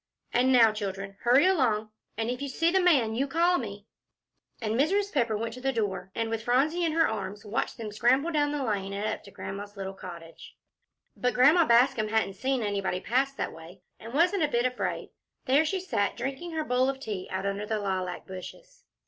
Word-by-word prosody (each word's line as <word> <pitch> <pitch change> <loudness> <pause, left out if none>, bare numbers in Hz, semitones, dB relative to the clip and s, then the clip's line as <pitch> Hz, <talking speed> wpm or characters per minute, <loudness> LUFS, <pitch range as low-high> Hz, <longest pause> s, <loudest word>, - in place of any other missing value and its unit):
And 255 +2 +3
now, 230 -4 +6
children, 195 -2 -5
hurry 250 +6 +5
along. 235 - +2 0.3
And 225 0 -1
if 250 - -5
you 280 - -3
see 330 +5 +1
the 380 +1 +3
man, 275 -11 +3
you 265 +5 0
call 340 +5 +2
me." 205 -4 -7 0.7
And 220 -2 -2
Mrs. 390 - +1
Pepper 235 -6 +1
went 225 +1 -3
to 250 - -9
the 270 +1 +1
door, 205 -6 -2
and, 225 0 -1
with 225 -1 -2
Phronsie 275 +9 +1
in 325 -2 +1
her 325 0 +4
arms, 205 -1 -5
watched 210 +2 -2
them 220 -2 -6
scramble 255 +9 +2
down 295 -2 +1
the 295 -2 -2
lane, 200 -4 -2
and 200 +1 -3
up 215 - -3
to - - -11
Grandma's 200 +1 -7
little 195 0 -5
cottage. 170 -3 -11 0.6
But 250 0 -1
Grandma 305 +7 +6
Bascom 235 -1 +4
hadn't 220 -2 0
seen 260 +4 -1
anybody 200 -3 -1
pass 260 +7 +1
that - - -4
way, 170 +3 -13 0.2
and 230 - -9
wasn't 345 +7 +2
a 305 - +3
bit 240 -3 0
afraid. 250 0 -2 0.3
There 280 +3 +4
she 380 +5 -1
sat, 205 - -1
drinking 275 +7 -4
her 315 -1 -1
bowl 255 -1 +2
of 270 0 -3
tea 205 -8 -5
out 190 +1 -3
under 200 +1 -2
the 220 - 0
lilac 185 -3 -3
bushes. - - -10
235 Hz, 210 wpm, -28 LUFS, 205-280 Hz, 0.7 s, now